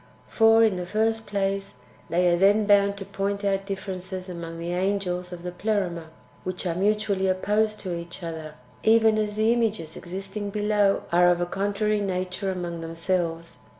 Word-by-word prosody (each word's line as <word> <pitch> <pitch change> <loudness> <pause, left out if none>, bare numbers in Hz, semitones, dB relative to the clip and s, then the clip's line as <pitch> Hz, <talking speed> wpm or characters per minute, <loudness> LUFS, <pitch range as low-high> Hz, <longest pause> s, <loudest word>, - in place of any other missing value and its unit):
For, 225 0 +5
in 215 -4 +3
the 180 - -3
first 220 +2 0
place, 195 -3 -2 0.3
they 180 +1 +2
are 175 - +4
then 200 +4 +4
bound 200 -1 +4
to 195 - -6
point 200 +1 -2
out 195 0 0
differences 190 -1 -5
among 170 -2 -6
the 170 +1 -3
angels 180 -1 -1
of 175 -1 -8
the 180 - -4
Pleroma, 180 -3 -2 0.4
which 185 0 -4
are 175 - 0
mutually 200 +1 +1
opposed 210 +3 +1
to 185 -3 -4
each 170 +1 -7
other, 160 -2 -6 0.3
even 220 -1 +4
as 210 -1 -1
the 220 +2 +3
images 215 -9 -1
existing, 195 +3 -5
below 205 -1 +2
are 175 +1 +5
of 175 -1 +2
a 175 - +1
contrary 205 +3 0
nature 185 0 -2
among 175 -2 -4
themselves. 165 0 -2
195 Hz, 170 wpm, -25 LUFS, 175-210 Hz, 0.4 s, For